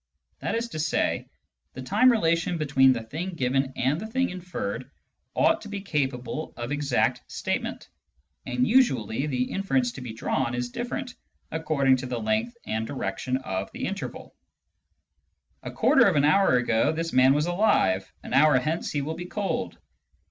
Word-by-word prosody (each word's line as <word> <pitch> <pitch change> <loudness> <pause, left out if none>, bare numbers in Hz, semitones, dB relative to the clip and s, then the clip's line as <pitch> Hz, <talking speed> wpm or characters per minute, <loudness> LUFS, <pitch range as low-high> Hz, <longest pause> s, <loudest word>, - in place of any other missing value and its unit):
That - - -2
is 230 +1 -1
to 155 - -6
say, 160 +1 0 0.4
the 130 - -7
time 215 - +4
relation 170 -5 +1
between 135 -4 +4
the 120 -3 -1
thing 170 +10 -5
given 135 -1 0
and 140 +7 0
the 220 - -5
thing 260 +1 0
inferred 135 - -5 0.5
ought 325 0 +3
to - - -9
be 200 -1 -4
capable 145 -4 -3
of 120 +2 -5
exact 145 -4 +1
statement; - - -3 0.6
and 125 0 +1
usually 135 - +2
the 125 -3 0
inference 135 -11 0
to 130 - -9
be 125 -3 -6
drawn 120 +1 -1
is 125 0 -3
diiFerent 245 - -4 0.4
according 150 -5 +2
to 130 0 -5
the 125 - -3
length 220 +2 -1
and 110 +1 -2
direction 130 -2 -2
of 95 -7 -4
the - - -4
interval. - - -6 0.7
" - - -48
A - - -6
quarter - - +4
of - - +2
an 145 0 +4
hour 155 -4 +4
ago 115 -2 +2
this 165 +1 -3
man 130 +2 +5
was 150 +1 +1
alive; 175 - +2
an - - -7
hour 150 -1 +6
hence 155 +6 -1
he 145 -1 -1
will 155 +3 -3
be 175 +1 -6
cold." 200 +1 -3
145 Hz, 170 wpm, -26 LUFS, 125-180 Hz, 0.7 s, hour